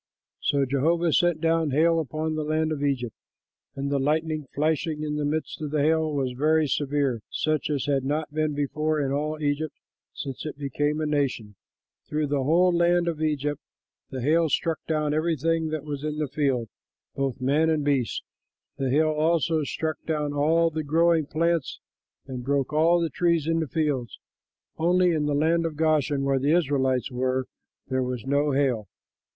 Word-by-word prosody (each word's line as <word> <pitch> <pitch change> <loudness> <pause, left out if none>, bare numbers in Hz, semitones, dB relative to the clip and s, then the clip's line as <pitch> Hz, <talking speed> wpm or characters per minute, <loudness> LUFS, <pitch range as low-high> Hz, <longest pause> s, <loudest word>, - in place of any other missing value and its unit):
'" - - -67
So 140 -1 +2
Jehovah 160 +5 +1
sent 175 -3 +2
down 165 -1 +2
hail 165 +4 +3
upon 155 +1 -2
the 155 0 -2
land 155 +1 0
of 150 -2 -3
Egypt, 125 -5 -1 0.6
and 140 +1 -3
the 140 - +1
lightning 155 +1 0
flashing 155 +1 0
in 150 0 -2
the 150 - -1
midst 155 +2 -3
of 150 - -3
the 150 -1 +1
hail 160 0 +2
was 135 -3 -1
very 155 +5 +2
severe, 140 -4 0
such 155 -2 -1
as 145 -3 -1
had 140 -2 +1
not 150 +2 -2
been 155 -1 0
before 150 +2 -1
in 135 -2 0
all 150 +2 -2
Egypt 145 +1 -1 0.4
since 135 -2 -6
it 155 - -6
became 145 +2 -1
a 155 - -1
nation. 140 -8 -1 0.6
Through 150 0 0
the 145 -1 +1
whole 175 +5 +4
land 175 0 +3
of 160 -2 -2
Egypt 150 -2 -1 0.5
the 130 -2 -5
hail 160 +3 +3
struck 165 +3 0
down 150 -2 0
everything 165 +1 0
that 155 -2 -3
was 145 -2 -5
in 150 0 -3
the 150 -1 -1
field, 130 -4 0 0.5
both 135 -3 -2
man 145 +5 +2
and 155 -2 0
beast. 135 -5 0 0.5
The 135 -2 -1
hail 155 +4 +3
also 160 +1 +1
struck 155 +2 -3
down 150 -2 -1
all 165 +3 +3
the 155 0 -3
growing 165 +1 +2
plants 165 -1 0 0.5
and 130 -2 -6
broke 140 +1 0
all 165 +3 +4
the 165 -2 -1
trees 170 0 +1
in 165 0 +1
the 160 - -1
fields. 145 -6 -1 0.6
Only 180 +2 +3
in 150 -3 0
the 145 - +1
land 165 +3 +2
of 155 - -6
Goshen, 150 -3 +1
where 135 -1 +1
the 145 +5 +3
Israelites 135 -5 0
were, 130 +1 0 0.4
there 130 0 0
was 125 -2 -3
no 140 +2 +1
hail. 130 -7 +1
150 Hz, 180 wpm, -26 LUFS, 140-160 Hz, 0.6 s, whole